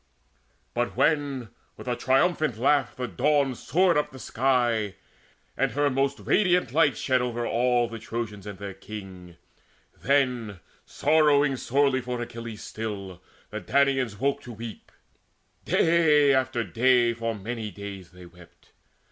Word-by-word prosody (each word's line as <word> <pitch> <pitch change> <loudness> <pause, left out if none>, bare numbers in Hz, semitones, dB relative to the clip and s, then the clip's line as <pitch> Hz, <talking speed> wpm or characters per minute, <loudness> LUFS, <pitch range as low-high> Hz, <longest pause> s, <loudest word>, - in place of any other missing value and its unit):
But 120 0 -2
when 140 -6 +1 0.3
with - - -11
a 125 - 0
triumphant 135 +1 +1
laugh 140 +2 +2
the 125 -1 -3
Dawn 140 - +1
Soared 175 +6 +2
up 150 - 0
the 130 - -12
sky, 120 -5 0 0.6
and 135 -3 0
her 145 +1 +1
most 135 +1 0
radiant 180 - +2
light 145 -6 +3
Shed 130 -2 +1
over 120 -1 -2
all 120 +1 +2
the 115 -1 -8
Trojans 105 -3 -5
and 100 -2 -7
their 100 0 -6
king, 95 -4 -10 0.6
Then, 125 -7 0 0.3
sorrowing 145 -2 +3
sorely 135 +1 +1
for 125 0 -4
Achilles 115 -2 -7
still, 100 -5 -6 0.3
The 110 0 -5
Danaans 135 0 +1
woke 140 +2 0
to 120 - -9
weep. 115 0 -9 0.7
Day 155 -4 +4
after 130 -3 +1
day, 120 +4 +3
For 115 0 -3
many 110 +2 -5
days 100 -3 -9
they 90 -1 -14
wept. 85 0 -19
125 Hz, 140 wpm, -26 LUFS, 110-140 Hz, 0.7 s, Day